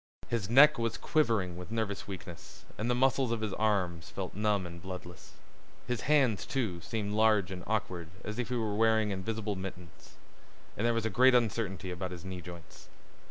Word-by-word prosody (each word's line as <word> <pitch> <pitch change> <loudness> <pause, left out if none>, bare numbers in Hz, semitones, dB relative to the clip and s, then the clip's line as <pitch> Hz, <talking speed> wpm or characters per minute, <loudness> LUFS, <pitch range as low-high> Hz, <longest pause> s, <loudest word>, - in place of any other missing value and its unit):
His 110 -4 -1
neck 145 +3 +7
was 115 -1 -1
quivering 110 - +1
with 90 0 -8
nervous 110 -3 -2
weakness 90 -3 -9
and 110 +3 -2
the 125 - +3
muscles 130 -1 +2
of 115 -2 -1
his 105 -3 -2
arms 95 -6 0
felt 95 -2 -5
numb 105 -2 +1
and 85 0 -8
bloodless. 90 -2 -9 0.5
His 125 -2 -2
hands, 135 -7 +2
too, 110 -11 -2
seemed 105 +4 -3
large 105 -3 +3
and 90 -1 -6
awkward 90 -6 -2
as 105 +2 -5
if 120 - -2
he 125 - -1
was 110 -3 -1
wearing 110 -2 +3
invisible 105 +2 -2
mittens. 90 -3 -9 0.6
And 115 - 0
there 120 - +2
was 115 -1 -1
a 110 - 0
great 125 +4 +6
uncertainty 105 -5 0
about 90 +1 -4
his 90 0 -8
knee 95 -1 -5
joints. 85 -1 -11
105 Hz, 185 wpm, -31 LUFS, 90-115 Hz, 0.6 s, neck